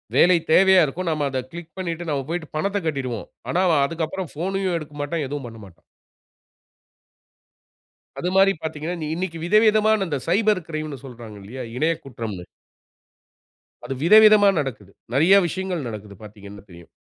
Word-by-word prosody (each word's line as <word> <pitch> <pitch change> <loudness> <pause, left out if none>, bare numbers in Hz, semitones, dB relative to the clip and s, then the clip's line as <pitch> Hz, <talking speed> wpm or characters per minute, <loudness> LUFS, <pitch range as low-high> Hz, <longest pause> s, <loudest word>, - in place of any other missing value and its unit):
வேலை 180 0 +6
தேவையா 190 +1 +6
இருக்கும். 170 +6 -5
நாம 155 -2 -1
அத 130 -1 -2
கிளிக் 170 -1 -10
பண்ணிவிட்டு 170 -2 -4
நாம 140 -3 -2
போய்ட்டு 165 -2 -5
பணத்தைக் 200 +2 -1
கட்டிருவோம். 130 -7 -3 0.2
ஆனா 180 - +1
அவன் 145 -4 +3
அதுக்கு 165 +2 -2
அப்புறம் 185 -1 -6
போனயும் 190 +1 -1
எடுக்க 150 -2 -9
மாட்டான். 150 +1 -2
எதுவும் 140 -1 -5
பண்ணமாட்டான். 105 -7 -13 2.4
அது 180 - -1
மாரி 195 0 +6
பார்த்தீங்கன்னா, 160 +2 -4 0.2
இன்னைக்கு 175 -1 -4
விதவிதமான 215 +1 +3
இந்த 145 -4 -2
சைபர் 205 0 +2
கிரைம்ன்னு 155 -4 -5
சொல்றாங்க 115 -4 -10
இல்லையா? 125 +6 -7
இணைய 160 +6 +1
குற்றம்ன்னு. 110 -8 -7 1.4
அது - - -3
விதவிதமா 215 +2 +7
நடக்குது. 110 -8 -5 0.2
நிறைய 175 +8 +6
விஷயங்கள் 180 -4 -4
நடக்குது, 105 -2 -8
பார்த்தீங்கன்னா 100 -1 -12
தெரியும். 85 -1 -14
160 Hz, 140 wpm, -22 LUFS, 130-185 Hz, 2.4 s, விதவிதமா